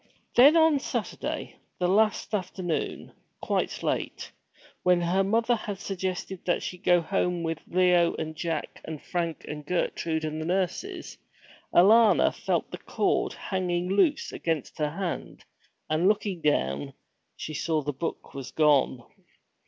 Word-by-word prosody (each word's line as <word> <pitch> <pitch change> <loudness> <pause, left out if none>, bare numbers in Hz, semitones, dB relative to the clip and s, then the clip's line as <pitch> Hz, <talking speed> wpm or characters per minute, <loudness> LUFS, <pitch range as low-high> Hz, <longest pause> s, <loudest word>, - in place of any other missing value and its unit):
Then 285 +7 +7
on 320 -3 +5
Saturday, - - -4 0.2
the 180 - +1
last 215 +3 +2
afternoon, 185 -4 -3 0.3
quite - - -2
late, - - -2 0.5
when 180 -1 +4
her 180 +3 +2
mother 230 +4 +2
had 210 -3 -5
suggested 190 -1 -4
that 175 - +1
she 180 - -5
go 175 -2 +4
home 180 -1 -1
with 165 -1 -2
Leo 180 -1 +3
and 155 0 -5
Jack 160 -1 -4
and 160 -2 -6
Frank 170 -1 -3
and 150 0 -6
Gertrude 160 -1 -1
and 155 0 -3
the - - -4
nurses, 195 - -2 0.5
Alanna 215 +4 +6
felt - - -2
the - - -6
cord - - 0
hanging 180 -2 -2
loose 285 - +2
against 160 -4 -3
her 150 -1 +1
hand, 175 +3 -5 0.4
and 155 +4 +2
looking 200 -4 0
down, 70 - 0 0.4
saw 155 0 -2
that - - -14
the 135 - -21
book 170 - -4
was 135 -2 -6
gone. 140 -4 +3
175 Hz, 140 wpm, -27 LUFS, 160-195 Hz, 0.5 s, Then